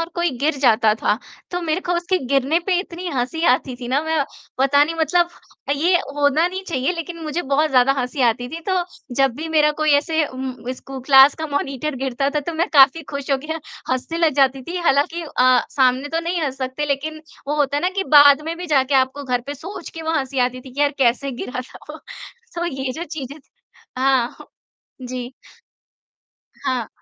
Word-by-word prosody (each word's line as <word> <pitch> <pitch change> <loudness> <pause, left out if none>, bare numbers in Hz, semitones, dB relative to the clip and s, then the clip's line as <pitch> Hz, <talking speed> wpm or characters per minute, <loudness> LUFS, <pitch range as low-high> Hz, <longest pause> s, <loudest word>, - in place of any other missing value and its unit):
और 330 - -2
कोई 345 -1 +1
गिर 290 +3 +1
जाता 225 -4 +4
था, 215 0 0 0.3
तो 355 0 -2
मेरे 320 +2 -1
को 355 - -2
उसके 360 +2 0
गिरने 275 +4 +2
पे 365 -2 +2
इतनी 355 -1 -7
हँसी 270 +5 -2
आती 255 0 -2
थी 240 - -6
ना 265 +3 +2
मैं 320 -3 0 0.3
पता 275 +2 +4
नहीं 330 - -4
मतलब 345 +2 +2 0.5
ये 350 +4 +3 0.2
होना 290 +3 +3
नहीं 375 +1 -5
चाहिए, 270 +2 0
लेकिन 335 0 -6
मुझे 315 +3 -3
बहुत 285 +3 +1
ज़्यादा 255 +1 +4
हँसी 255 +2 -3
आती 245 +2 -2
थी, 330 +4 -7
तो 370 -2 +1 0.3
जब 270 -1 +3
भी 320 +2 -5
मेरा 300 -1 +3
कोई 310 0 +3
ऐसे 315 +1 +1
उम, 260 0 -5 0.2
स्कू 265 +1 -9
क्लास 270 +1 +7
का 315 0 -4
मॉनिटर 285 0 -3
गिरता 270 +1 -1
था 300 0 -1
तो 335 +4 -5
मैं 335 +2 0
काफ़ी 280 +2 +6
खुश 280 -1 -5
हो 275 - +4
के 315 - -3 0.4
हँसने 325 +6 -3
लग 325 -3 +3
जाती 270 -1 +3
थी। 345 +6 -6
हालाँकि 330 +1 +1
अ, 255 -5 +3
सामने 260 +1 +2
तो 325 +2 -1
नहीं 340 +1 -2
हँस 270 -3 -2
सकते 260 +3 -3
लेकिन 305 +2 -3 0.3
वो 300 - 0
होता 285 -1 +1
है 290 - -1
ना 360 - +3
कि 385 - -2
बाद 285 0 +8
में 330 +1 -4
भी 360 - -6
जाके 280 -3 +2
आपको 265 +2 +1
घर 250 -2 0
पे 285 - -4
सोच 345 +5 -8
के 325 - -8
वहाँ 320 0 0
हँसी 270 0 -4
आती 250 0 0
थी 260 0 -12
कि 280 - -5
यार 290 -1 +4
कैसे 260 +2 +2
गिरा 250 +1 -5
था 255 - -12
वो, - - -9 0.6
तो 345 - -2
ये 265 -4 -3
जो 330 +6 -5
चीज़ें 290 -2 -7 0.6
हाँ। 260 -3 +2 0.7
जी। 250 0 -6 1.3
हाँ। 250 -4 -1
285 Hz, 205 wpm, -21 LUFS, 260-325 Hz, 1.3 s, बाद